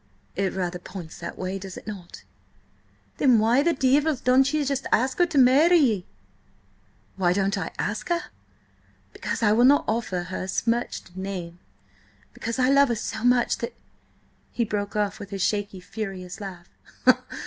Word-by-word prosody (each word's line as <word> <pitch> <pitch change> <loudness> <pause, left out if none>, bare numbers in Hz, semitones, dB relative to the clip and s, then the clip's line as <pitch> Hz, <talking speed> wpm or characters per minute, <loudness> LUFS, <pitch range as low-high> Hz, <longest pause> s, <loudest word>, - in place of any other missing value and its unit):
"It 195 0 -1
rather 180 -1 -3
points 175 -3 -9
that - - -7
way, 185 +1 -3
does 190 -1 -8
it - - -10
not?" 195 -5 -9 0.9
"Then 255 -4 +5
why 230 +5 +4
the 340 +3 +3
divil 285 +3 +2
don't 260 +2 +3
ye 305 -1 0 0.3
ask 260 +5 +1
her 350 - +5
to 325 -4 -3
marry 280 +7 +6
ye?" 220 - +2 1.1
"Why 175 -2 +2
don't 195 +1 +1
I 180 -5 -3
ask 205 - -3
her? 345 0 -1 0.8
Because - - -4
I 210 - +5
will 230 +3 +4
not 280 +3 +5
offer 215 -6 -1
her 185 +1 -5
a - - -8
smirched 230 -4 -2
name! 185 -3 -6 0.7
Because 230 +2 -4
I 255 -1 +3
love 280 0 +5
her 235 - +1
so 220 +1 -5
much 245 -1 +3
that—" 235 - -5 0.8
He 235 - 0
broke 205 -1 -3
off 205 0 -1
with 205 -1 -9
a - - -2
shaky, 200 0 -1
furious 190 -1 -6
laugh. 185 -3 -8
215 Hz, 165 wpm, -25 LUFS, 190-255 Hz, 1.1 s, marry